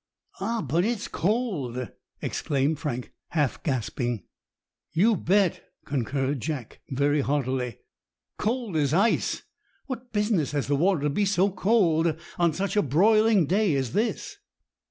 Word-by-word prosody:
"Ah, 225 Hz, +2 st, -1 dB
but 160 Hz, +5 st, +1 dB
it's 225 Hz, 0 st, -1 dB
cold!" 165 Hz, -, -1 dB, 0.3 s
exclaimed 145 Hz, +1 st, 0 dB
Frank, 125 Hz, -5 st, -4 dB, 0.2 s
half 150 Hz, -6 st, 0 dB
gasping. 120 Hz, -4 st, -2 dB, 0.7 s
"You 210 Hz, +7 st, +4 dB
bet," 190 Hz, +1 st, +2 dB, 0.2 s
concurred 135 Hz, +1 st, -1 dB
Jack, 135 Hz, -3 st, -5 dB
very 145 Hz, +2 st, +2 dB
heartily—"cold 145 Hz, -, -3 dB
as 145 Hz, 0 st, +2 dB
ice! 210 Hz, +6 st, +2 dB, 0.4 s
What 250 Hz, -2 st, -6 dB
business 210 Hz, -9 st, +1 dB
has 145 Hz, -2 st, 0 dB
the 145 Hz, -, +1 dB
water 175 Hz, +2 st, +2 dB
to 150 Hz, -, +1 dB
be 205 Hz, +8 st, +1 dB
so 195 Hz, 0 st, +2 dB
cold 175 Hz, -5 st, +2 dB, 0.2 s
on 170 Hz, -1 st, +4 dB
such 190 Hz, +6 st, -2 dB
a 205 Hz, -, +5 dB
broiling 210 Hz, -, +4 dB
day 190 Hz, 0 st, +2 dB
as 130 Hz, -3 st, -1 dB
this?" 215 Hz, +2 st, -1 dB
160 Hz, 130 wpm, -26 LUFS, 140-205 Hz, 0.7 s, a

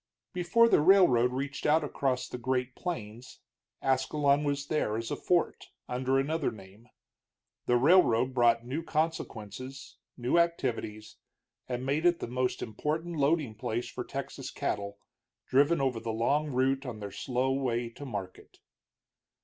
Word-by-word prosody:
Before 190 Hz, +6 st, +4 dB
the 190 Hz, -, +4 dB
railroad 150 Hz, -9 st, +5 dB
reached 135 Hz, +3 st, -3 dB
out 155 Hz, +1 st, +4 dB
across 135 Hz, -3 st, -1 dB
the 125 Hz, -, -7 dB
Great 125 Hz, 0 st, -1 dB
Plains, 120 Hz, -, -6 dB, 0.4 s
Ascalon 140 Hz, +2 st, +2 dB
was 140 Hz, -1 st, -1 dB
there 140 Hz, -8 st, 0 dB
as 115 Hz, 0 st, -4 dB
a -, -, 0 dB
fort, 175 Hz, -1 st, 0 dB, 0.2 s
under 130 Hz, +2 st, 0 dB
another 150 Hz, +3 st, 0 dB
name. 105 Hz, +2 st, -14 dB, 0.8 s
The 120 Hz, -, +4 dB
railroad 130 Hz, -4 st, +4 dB
brought 120 Hz, -2 st, +3 dB
new 135 Hz, +6 st, -3 dB
consequence, 135 Hz, -6 st, -4 dB, 0.2 s
new 125 Hz, +7 st, +2 dB
activities, 120 Hz, -10 st, -2 dB, 0.5 s
and 125 Hz, 0 st, -3 dB
made 150 Hz, +5 st, +2 dB
it 175 Hz, -1 st, +3 dB
the -, -, -3 dB
most 125 Hz, +1 st, -2 dB
important 155 Hz, +9 st, -3 dB
loading 145 Hz, -4 st, +1 dB
place 110 Hz, +2 st, -3 dB
for -, -, -5 dB
Texas -, -, -6 dB
cattle, 100 Hz, 0 st, -3 dB, 0.5 s
driven 145 Hz, +5 st, +3 dB
over 130 Hz, -4 st, 0 dB
the 115 Hz, 0 st, -6 dB
long 140 Hz, +7 st, +1 dB
route 135 Hz, 0 st, +1 dB
on 120 Hz, -5 st, -6 dB
their 100 Hz, -1 st, -6 dB
slow 130 Hz, +4 st, -1 dB
way 120 Hz, -3 st, -1 dB
to 115 Hz, -, -11 dB
market. 100 Hz, -8 st, -7 dB
130 Hz, 145 wpm, -30 LUFS, 120-150 Hz, 0.8 s, railroad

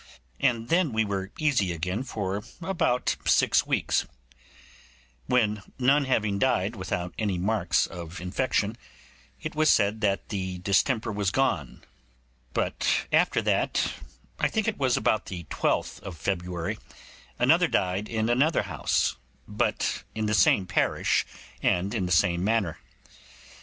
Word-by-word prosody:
And 115 Hz, -1 st, +1 dB
then 165 Hz, -6 st, +2 dB
we 110 Hz, 0 st, +2 dB
were 95 Hz, -1 st, -3 dB
easy 140 Hz, -, +1 dB
again 90 Hz, +6 st, -2 dB
for 100 Hz, -6 st, -3 dB, 0.2 s
about 165 Hz, -8 st, 0 dB
six -, -, +3 dB
weeks, -, -, +1 dB, 1.2 s
when 105 Hz, -4 st, +2 dB, 0.2 s
none 135 Hz, +3 st, +3 dB
having 105 Hz, -6 st, 0 dB
died 110 Hz, -3 st, +1 dB
with 95 Hz, -3 st, -7 dB, 0.3 s
any 100 Hz, -4 st, 0 dB
marks 95 Hz, -1 st, +1 dB
of 85 Hz, -1 st, -8 dB
infection, 105 Hz, +3 st, -1 dB, 0.6 s
it 155 Hz, -, -5 dB
was 155 Hz, 0 st, +3 dB
said 105 Hz, +2 st, +3 dB
the 95 Hz, -2 st, -1 dB
distemper 110 Hz, +5 st, +1 dB
was 100 Hz, -2 st, 0 dB
gone; 95 Hz, -, -1 dB, 0.7 s
but -, -, 0 dB
after -, -, +3 dB
that, -, -, +1 dB, 0.5 s
I -, -, +3 dB
think 220 Hz, -1 st, -1 dB
it 220 Hz, -, -1 dB
was 130 Hz, -3 st, +2 dB
about 110 Hz, -, +1 dB
the 90 Hz, -2 st, -6 dB
12th -, -, 0 dB
of 95 Hz, -4 st, -8 dB
February, 90 Hz, -2 st, -3 dB, 0.6 s
another -, -, +4 dB
died 95 Hz, +3 st, -1 dB
in 110 Hz, -1 st, 0 dB
another 135 Hz, +7 st, +2 dB
house, -, -, 0 dB, 0.3 s
but -, -, -1 dB
in 110 Hz, -1 st, -1 dB
the 105 Hz, -, 0 dB
same 95 Hz, -1 st, +4 dB
parish 90 Hz, -, +1 dB, 0.3 s
and 95 Hz, +3 st, +1 dB
in 95 Hz, -6 st, -1 dB
the -, -, -5 dB
same 85 Hz, +1 st, +3 dB
manner. 105 Hz, -5 st, 0 dB
105 Hz, 135 wpm, -27 LUFS, 95-125 Hz, 1.2 s, another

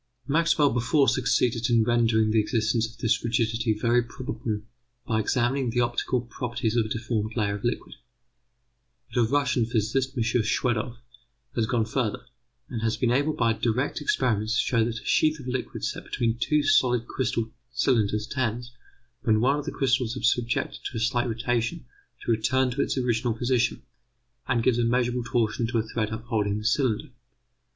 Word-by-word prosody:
Maxwell 155 Hz, -1 st, +3 dB
before 125 Hz, +5 st, +2 dB
succeeded 125 Hz, -1 st, +1 dB
in 115 Hz, -2 st, +4 dB
rendering 115 Hz, -2 st, +2 dB
the 110 Hz, -, +3 dB
existence 110 Hz, +1 st, +1 dB
of 115 Hz, -, -16 dB
this 115 Hz, -, +1 dB
rigidity 115 Hz, -1 st, 0 dB
very 120 Hz, +2 st, +3 dB
probable 115 Hz, -3 st, -5 dB, 0.4 s
by 110 Hz, -2 st, 0 dB
examining 125 Hz, +3 st, +1 dB
the 120 Hz, +2 st, +1 dB
optical 120 Hz, +1 st, 0 dB
properties 120 Hz, -1 st, -3 dB
of 115 Hz, -2 st, +2 dB
a -, -, -10 dB
deformed 110 Hz, -1 st, -2 dB
layer 100 Hz, -3 st, +1 dB
of 100 Hz, -, -6 dB
liquid. 120 Hz, -, -2 dB, 1.2 s
But 120 Hz, -, +2 dB
a -, -, +5 dB
Russian 130 Hz, -2 st, +1 dB
physicist, 125 Hz, +4 st, -1 dB
M. 115 Hz, -, +2 dB
Schwedoff, 115 Hz, +1 st, 0 dB, 0.6 s
has 115 Hz, -2 st, +1 dB
gone 115 Hz, -1 st, +1 dB
further, 125 Hz, +1 st, -2 dB, 0.4 s
and 115 Hz, -3 st, -5 dB
has 110 Hz, -1 st, 0 dB
been 120 Hz, -2 st, +1 dB
able 145 Hz, +5 st, +2 dB
by 115 Hz, -6 st, +2 dB
direct 120 Hz, +6 st, -1 dB
experiments 115 Hz, -6 st, +1 dB
to -, -, +2 dB
show 115 Hz, -3 st, +2 dB
that 115 Hz, 0 st, -3 dB
a -, -, -18 dB
sheath 155 Hz, 0 st, +2 dB
of 135 Hz, -, -10 dB
liquid 125 Hz, 0 st, -4 dB
set -, -, -4 dB
between 115 Hz, -1 st, -1 dB
two 150 Hz, +3 st, +2 dB
solid 125 Hz, -4 st, +3 dB, 0.7 s
cylinders 110 Hz, -5 st, +1 dB
tends, 120 Hz, -1 st, -2 dB, 0.5 s
when 110 Hz, -4 st, +3 dB
one 135 Hz, +5 st, +2 dB
of 145 Hz, -, -6 dB
the 140 Hz, -2 st, -2 dB
cylinders 125 Hz, -2 st, +1 dB
is 120 Hz, -, +4 dB
subjected 120 Hz, -1 st, -2 dB
to 125 Hz, -, -5 dB
a -, -, -1 dB
slight 120 Hz, +2 st, +1 dB
rotation, 120 Hz, +6 st, -1 dB, 0.4 s
to -, -, +1 dB
return 125 Hz, +4 st, +2 dB
to 135 Hz, +3 st, -1 dB
its -, -, -1 dB
original 120 Hz, -2 st, 0 dB
position, 125 Hz, +1 st, 0 dB, 0.6 s
and 120 Hz, -2 st, +1 dB
gives 120 Hz, -1 st, +2 dB
a -, -, +2 dB
measurable 120 Hz, +1 st, +1 dB
torsion 115 Hz, -1 st, 0 dB
to 120 Hz, -, -1 dB
a 110 Hz, -, +1 dB
thread 110 Hz, -1 st, -2 dB
upholding 110 Hz, -2 st, -1 dB
the 105 Hz, -, -6 dB
cylinder. 115 Hz, -2 st, +1 dB
120 Hz, 175 wpm, -26 LUFS, 110-125 Hz, 1.2 s, a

